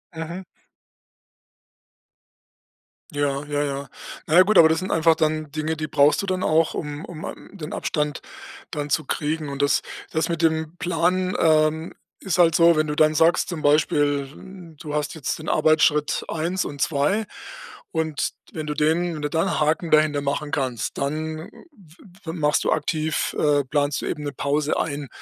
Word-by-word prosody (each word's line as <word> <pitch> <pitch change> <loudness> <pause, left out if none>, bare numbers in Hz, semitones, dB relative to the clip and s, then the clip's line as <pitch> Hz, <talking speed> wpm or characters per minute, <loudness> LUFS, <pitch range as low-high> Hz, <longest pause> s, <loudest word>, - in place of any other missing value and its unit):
Mhm. 170 +3 -6 2.7
Ja, 145 -1 -1
ja, 145 0 -1
ja. 140 -1 -4 0.4
Na 160 - 0
ja 185 - +9
gut, 215 0 +2
aber 160 - +9
das 160 0 +1
sind 185 - -4
einfach 165 0 +4
dann 155 -1 -1
Dinge, 155 +1 -2
die 155 0 -3
brauchst 145 +1 +3
du - - -4
dann 185 -1 -1
auch, 160 +1 +2
um 150 0 -5
um, 160 -2 -9
ähm, - - -9
den 165 -5 -7
Abstand 150 -1 -2 0.5
dann 145 -2 -4
zu 135 - 0
kriegen. 155 +2 -2
Und 140 0 -4
das 140 - +3 0.3
das 160 - 0
mit 170 -1 -2
dem 160 0 0
Plan, 180 +1 0
ähm, 155 0 +2 0.3
ist 185 -3 -2
halt 165 -2 +5
so, 170 0 +6
wenn 155 0 +1
du 150 - -2
dann 155 0 +4
sagst, 165 +2 +3
zum 165 -4 -4
Beispiel, 150 +4 0
du 150 -3 -7
hast 150 -1 -1
jetzt 155 -5 -3
den 155 - -9
Arbeitsschritt 155 -1 +2
1 170 +4 -2
und 145 -1 -6
2 165 +9 +1 0.6
und 160 -3 -1 0.2
wenn 155 -1 -5
du 150 - -1
den 165 +4 +1
wenn 150 - -6
du 150 - -2
da 160 +1 0
'n 190 - -1
Haken 160 +2 0
dahinter 155 -1 +3
machen 145 +1 -2
kannst, 130 -7 -2
dann 155 +3 -3 0.2
w 185 - -20 0.3
w 160 - -3
machst 150 -3 +1
du - - +2
aktiv 155 0 -1
äh, 145 -1 +3
planst 145 +1 0
du - - -4
eben 150 - -3
'ne 145 - -4
Pause 145 +2 0
ein, 145 -2 -3
155 Hz, 180 wpm, -23 LUFS, 145-165 Hz, 2.7 s, ja